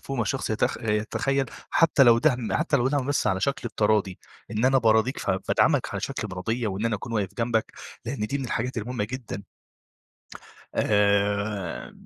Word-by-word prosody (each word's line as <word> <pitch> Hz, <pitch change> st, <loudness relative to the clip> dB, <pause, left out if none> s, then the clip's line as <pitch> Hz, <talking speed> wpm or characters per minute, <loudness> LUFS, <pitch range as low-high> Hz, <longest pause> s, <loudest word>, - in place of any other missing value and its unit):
فوق 135 Hz, -, -4 dB
ما 120 Hz, -, +1 dB
الشخص 130 Hz, +4 st, -2 dB
يتخ 110 Hz, -, 0 dB
يتخيل 115 Hz, +5 st, 0 dB, 0.2 s
حتى 165 Hz, -4 st, +4 dB
لو 120 Hz, -3 st, +7 dB
دعم 125 Hz, -4 st, +1 dB
حتى 155 Hz, -, +2 dB
لو 125 Hz, +2 st, +2 dB
دعم 140 Hz, -2 st, 0 dB
بس 145 Hz, -6 st, 0 dB
على 95 Hz, -2 st, +1 dB
شكل 135 Hz, 0 st, -1 dB
التراضي، 105 Hz, -4 st, +1 dB, 0.3 s
إن 110 Hz, +2 st, -1 dB
أنا 135 Hz, 0 st, +5 dB
باراضيك، 110 Hz, +2 st, +2 dB
فبادعمك -, -, +1 dB
على -, -, -3 dB
شكل 105 Hz, -, -4 dB
مراضية 110 Hz, +6 st, -2 dB
وإن 100 Hz, +2 st, -3 dB
أنا 115 Hz, -, 0 dB
أكون 115 Hz, +3 st, -7 dB
واقف 100 Hz, -3 st, -1 dB
جنبك 115 Hz, -2 st, 0 dB, 0.3 s
لأن 115 Hz, -3 st, -3 dB
دي 140 Hz, +5 st, -2 dB
من 135 Hz, -, -4 dB
الحاجات 125 Hz, +2 st, -2 dB
المهمة 120 Hz, -1 st, -2 dB
جدًا. 110 Hz, -4 st, -6 dB, 1.3 s
آآ 100 Hz, -2 st, +1 dB
115 Hz, 170 wpm, -26 LUFS, 105-130 Hz, 1.3 s, لو